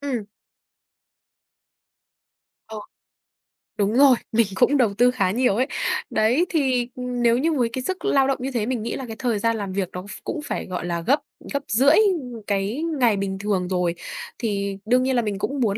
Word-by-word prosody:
ừm. 280 -3 -2 2.5
Ờ. 220 -1 -7 1.0
Đúng 205 +1 +1
rồi, 275 -3 +7 0.2
mình 225 -2 +3
cũng 275 +5 +3
đầu 225 -6 +2
tư 245 +4 +4
khá 210 -7 +1
nhiều 245 -2 +2
ấy. 255 +4 +1 0.4
Đấy, 245 +11 +2
thì, 260 -6 +1
ừm, 250 -1 -4
nếu 235 0 +4
như 320 +4 +1
với 245 -5 +1
cái 260 - -2
sức 375 +5 -4
lao 275 -8 +3
động 270 - +1
như 270 +1 -3
thế 230 -4 -1
mình 240 -3 -2
nghĩ 235 - -3
là 265 - -5
cái 225 - -6
thời 235 -5 0
gian 230 +1 +1
làm 195 -2 -4
việc 190 -2 -1
nó 180 - -5
ph - - -13 0.2
cũng 320 - -4
phải, - - -3
gọi 180 -1 -4
là, 170 -1 -2
gấp 280 - +2 0.3
gấp 280 0 -1
rưỡi, 275 +7 +4
ừm, 300 - +1
cái 205 +9 -1 0.2
ngày 225 -5 +3
bình 195 -1 -2
thường 195 -3 -1
rồi 180 -2 0 0.4
thì 200 -3 -2
đương 250 +3 +3
nhiên 260 0 +1
là 240 - +3
mình 205 -3 -3
cũng 280 +4 -2
muốn 210 -2 +1
235 Hz, 200 wpm, -23 LUFS, 205-265 Hz, 2.5 s, rồi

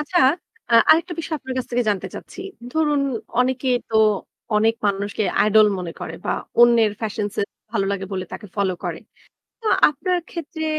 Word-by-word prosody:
আচ্ছা, 300 +4 0 0.5
আ - - +4 0.2
আরেকটা 335 +3 +4
বিষয় 330 -1 -2
আপনার 260 -2 -6
কাছ 255 - -3
থেকে 245 0 +1
জানতে 200 -2 -2
চাচ্ছি। - - -9 0.3
ধরুন 300 -2 +2 0.4
অনেকে 260 +1 0 0.2
তো 225 - 0 0.6
অনেক 220 +2 +3
মানুষকে 200 +1 -1 0.2
আইডল 215 0 +6
মনে 175 -2 -5
করে - - -5
বা - - 0 0.3
অন্যের 235 -3 +6
ফ্যাশন 215 -1 -2
সেন্স 200 - -1 0.2
ভালো 205 -4 0
লাগে 195 -1 -3
বলে 185 -1 -2
তাকে 210 - -7
ফলো 200 -2 +1
করে। - - -3 0.6
তো 450 - -7 0.2
আপনার 360 +5 -1
ক্ষেত্রে 320 -1 -5
235 Hz, 165 wpm, -22 LUFS, 205-300 Hz, 0.6 s, আইডল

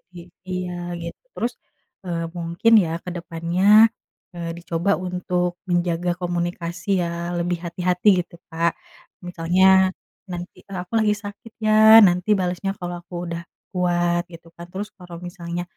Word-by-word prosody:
I 175 0 -11 0.2
iya, 175 -1 -4
gitu. 170 0 -8
Terus, 235 +1 -2 0.5
eee, 165 -1 -3
mungkin, 170 +7 +1
ya, 165 - -3
ke 180 - -5
depannya, 180 +6 +4 0.5
eee, 170 -1 -4
dicoba 170 +2 -1 0.2
untuk 180 -1 -1
menjaga 175 0 +1
komunikasi, 175 +2 -2
ya, 170 +1 -3
lebih 175 0 -1
hati-hati 180 +3 -1
gitu, 170 - -14 0.2
Kak. 165 +1 +1 0.5
Misalnya, 185 +2 +4 0.4
nanti 175 0 -7
eee, 195 -1 -8
"Aku 180 - -20
lagi 210 -1 +3
sakit, 205 +2 -10
ya, 220 0 +7
nanti 180 +4 0
balasnya 180 +1 -1
kalau 175 -1 -5
aku 175 0 -6
udah 170 0 -4 0.3
kuat," 175 -1 +1
gitu, 165 -1 -13
kan. 170 0 -10
Terus 205 +2 -5
kalau 180 -3 -10
misalnya 175 -1 -5
175 Hz, 140 wpm, -22 LUFS, 170-185 Hz, 0.5 s, ya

